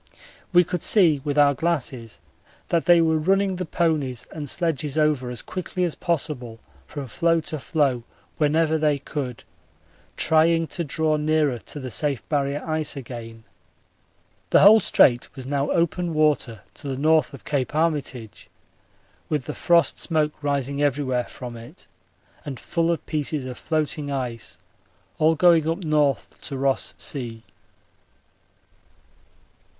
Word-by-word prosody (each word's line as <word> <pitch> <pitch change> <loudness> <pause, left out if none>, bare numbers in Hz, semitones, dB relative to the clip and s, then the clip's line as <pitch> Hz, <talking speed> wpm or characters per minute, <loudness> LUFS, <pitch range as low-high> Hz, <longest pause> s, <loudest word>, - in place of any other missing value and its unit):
We 175 -1 +6
could 175 0 -4
see 165 -9 +4
with 145 -1 -2
our 145 -1 +5
glasses 130 -7 -2 0.5
that 170 -1 +1
they 175 -1 +6
were 160 -1 +2
running 195 +3 +1
the 180 -2 -4
ponies 150 -9 -1
and 150 -3 -4
sledges 155 -3 -1
over 150 -5 +1
as 125 - -4
quickly 185 0 -4
as 170 -3 0
possible 140 -9 -3 0.3
from 145 -2 -6
floe 165 +6 +1
to 155 0 -4
floe 140 -4 0 0.4
whenever 160 +1 +2
they 150 -2 +2
could, 135 -3 -6 0.7
trying 165 +1 +3
to 170 - -1
draw 155 +1 0
nearer 150 -4 +1
to 130 +8 -8
the 130 -2 -6
safe 140 0 0
Barrier 145 0 -1
ice 155 -2 0
again. 115 -3 -9 1.1
The - - +5
whole 215 +3 +8
Strait 120 - +3
was 130 - -7
now 140 +1 -1
open 170 0 0
water 150 -7 +1
to 145 - -8
the 135 - -2
N. 140 +3 -4
of 155 -4 +2
Cape 140 -2 -2
Armitage, 145 -8 -2 0.8
with 150 -5 -1
the - - -5
frost 170 -1 +2
smoke 155 -3 +1
rising 140 -1 -1
everywhere 135 -3 0
from 125 -2 -9
it, 115 0 -12 0.6
and 135 -4 -7
full 165 0 -1
of 170 - -1
pieces 150 -2 -3
of 130 -1 -6
floating 155 -2 -2
ice, 125 -4 -5 0.6
all 160 +1 +4
going 165 -1 +4
up 170 +2 -3
N. 155 - -3 0.5
to 140 - -4
Ross 135 0 0
Sea. 115 -5 -2
150 Hz, 145 wpm, -23 LUFS, 135-160 Hz, 1.1 s, whole